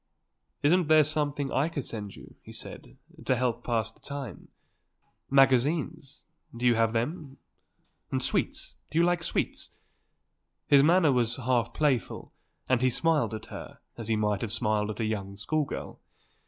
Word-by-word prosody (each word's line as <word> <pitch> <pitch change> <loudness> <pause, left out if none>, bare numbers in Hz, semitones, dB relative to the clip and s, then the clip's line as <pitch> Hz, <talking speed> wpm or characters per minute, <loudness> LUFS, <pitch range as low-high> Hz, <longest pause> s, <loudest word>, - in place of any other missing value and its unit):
"Isn't 170 +3 +4
there 155 0 +6
something 145 -2 -2
I 145 +5 +1
could 145 -6 -4
send 105 -3 -5
you," - - -13
he - - -12
said, - - -10 0.3
"to 130 - +2
help 125 -1 0
to - - -27
pass 115 -3 0
the - - -26
time? 140 -4 -7 0.8
Magazines? 140 +3 +2 0.3
Do 120 - -3
you 120 - +6
have 115 0 +2
them? 135 +4 -3 0.7
And - - +1
sweets? - - -1
Do - - -3
you 170 - +5
like 175 -1 +1
sweets?" - - -1 1.0
His 140 -1 +6
manner 165 +1 +5
was 120 -2 +1
half 125 -2 0
playful 140 -6 -1 0.3
and 130 -2 +2
he 130 - +4
smiled 150 -2 +1
at 110 - -8
her - - -8 0.2
as 115 -2 -7
he 115 - +2
might 105 -2 0
have 115 - -3
smiled 105 -1 +1
at 110 - -5
a 115 - 0
young 100 -2 -3
school 150 +9 0
girl. - - -7
130 Hz, 170 wpm, -28 LUFS, 115-150 Hz, 1.0 s, there